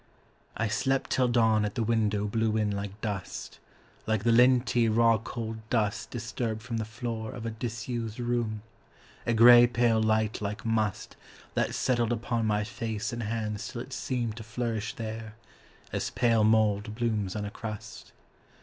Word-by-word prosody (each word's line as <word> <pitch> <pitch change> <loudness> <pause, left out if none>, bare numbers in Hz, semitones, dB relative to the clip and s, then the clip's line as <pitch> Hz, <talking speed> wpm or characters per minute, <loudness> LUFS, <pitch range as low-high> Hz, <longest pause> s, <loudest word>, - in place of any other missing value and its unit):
I 115 - 0
slept 135 +5 0
till 130 -1 +3
dawn 115 -3 +3
at 105 +4 -2
the 120 - 0
window 105 -2 +1
blew 110 +1 0
in 105 -1 +1
like 100 0 -5
dust, 100 -4 -5 0.5
Like 110 -2 +1
the 120 - +3
linty, 120 -1 +4
raw 115 0 +4
cold 115 0 -5
dust 105 -4 0
disturbed 115 -1 -4
from 120 -1 -3
the 110 - -2
floor 110 0 -5
Of 120 -3 -7
a 115 - -2
disused 115 0 -4
room: 120 -3 -1 0.6
a 115 - +3
grey 120 +1 +9
pale 120 -2 +2
light 110 0 +1
like 105 +1 -4
must 110 -3 -1 0.4
That - - 0
settled 120 -2 +1
upon 115 -1 -1
my 105 -1 +1
face 110 0 -4
and 120 - -3
hands 105 -1 -3
till 125 -2 -5
it 130 - -9
seemed 120 -5 -2
To 115 - -6
flourish 115 -1 -3
there, 110 -1 -6 0.6
as - - -1
pale 115 -3 +2
mould 110 -1 +2
blooms 110 -5 -1
on 105 -1 -2
a 100 - -5
crust. 110 0 -8
110 Hz, 165 wpm, -28 LUFS, 110-120 Hz, 0.6 s, grey